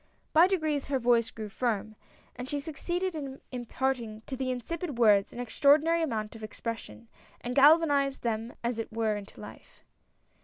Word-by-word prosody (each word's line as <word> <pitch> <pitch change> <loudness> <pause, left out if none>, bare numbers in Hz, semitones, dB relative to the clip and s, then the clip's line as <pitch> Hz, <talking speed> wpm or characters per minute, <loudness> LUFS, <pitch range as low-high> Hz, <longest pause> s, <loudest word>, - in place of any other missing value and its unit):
By 330 +3 +7
degrees 310 -7 0
her 275 -1 +1
voice 235 -2 +3
grew 220 -1 -7
firm, 220 -1 -2 0.4
and 250 +1 -6
she 290 - -1
succeeded 345 +5 -3
90 - - -5
A - - -3
NEW 265 - -9
IDEA. - - -20
in 250 -2 -4
imparting 240 -3 -2
to 265 - -4
the 260 0 -2
insipid 290 +4 -4
words 210 -4 +4
an - - -9
extraordinary 295 +7 +3
amount 220 -8 -2
of 220 - -10
expression, 210 - -6 0.3
and 245 - -4
galvanized 285 -1 +4
them 230 0 -2
as 235 -1 -1
it 225 - -4
were 220 -1 0
into 205 -1 -9
life. - - -13
250 Hz, 185 wpm, -29 LUFS, 225-290 Hz, 0.4 s, By